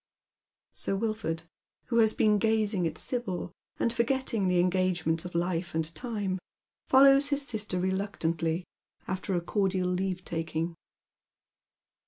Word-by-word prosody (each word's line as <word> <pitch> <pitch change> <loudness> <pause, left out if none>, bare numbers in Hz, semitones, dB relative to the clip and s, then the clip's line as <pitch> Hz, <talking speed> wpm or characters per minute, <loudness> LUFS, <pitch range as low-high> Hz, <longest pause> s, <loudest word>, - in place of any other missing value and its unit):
Sir 195 - -2
Wilford, 195 -6 -2 0.5
who 235 -1 +3
has 220 -1 +6
been 210 -2 +3
gazing 215 -4 +2
at 155 -1 -5
Sibyl, 195 -8 -3 0.3
and 235 - +1
forgetting 235 -4 0
the 180 0 +2
engagements 180 -2 +1
of 180 - -7
life 170 -1 -1
and 160 0 -1
time, 205 -2 -3 0.5
follows 275 +1 +7
his 285 -1 +1
sister 210 -5 -1
reluctantly, 180 -3 -1 0.4
after 190 0 -2
a 175 - +1
cordial 190 0 0
leave 185 0 -1
taldng. 165 0 -2
190 Hz, 125 wpm, -29 LUFS, 175-220 Hz, 0.5 s, follows